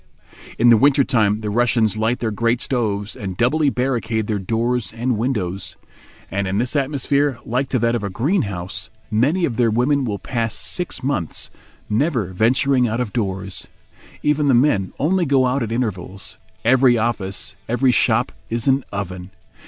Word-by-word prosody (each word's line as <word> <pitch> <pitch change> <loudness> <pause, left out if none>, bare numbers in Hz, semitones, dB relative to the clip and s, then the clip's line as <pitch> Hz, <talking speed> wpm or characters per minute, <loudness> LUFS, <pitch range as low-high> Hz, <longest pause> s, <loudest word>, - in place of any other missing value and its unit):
In 120 +1 +5
the 115 - +7
winter 140 +3 +4
time 110 -5 +2
the 105 -1 -3
Russians 115 -2 +2
light 110 +3 0
their 115 -2 0
great 115 +3 +1
stoves, 105 -6 -1
and 95 -3 -6
doubly 145 +5 +2
barricade 120 -4 -1
their 105 -1 -1
doors 115 +4 -1
and 120 +2 -1
windows; 105 -6 -2 0.6
and 100 0 -1
in 95 +1 -1
this 125 +6 0
atmosphere, 140 -1 +1
like 130 +3 -1
to 130 - +1
that 115 0 +1
of 120 - -1
a 100 - -2
greenhouse, 95 - -2 0.2
many 145 +12 +2
of 120 - -3
their 120 -2 +3
women 130 +5 +2
will 105 -5 -2
pass 115 0 -3
six 180 -6 -3
months, 130 - -2 0.4
never 115 - 0
venturing 125 +5 +2
out 115 +2 -2
of 120 -5 -3
doors. 95 -4 -3 0.6
Even 150 0 +2
the 135 - +5
men 120 -7 +2
only 175 +6 +1
go 135 -4 +3
out 130 +2 0
at 115 -2 -3
intervals. 105 -3 -4 0.3
Every 125 0 +5
office, 100 -4 -2
every 125 +2 +3
shop - - +2 0.2
is 115 +3 -1
an 135 0 +3
oven. 90 -2 -5
115 Hz, 170 wpm, -20 LUFS, 105-130 Hz, 0.6 s, the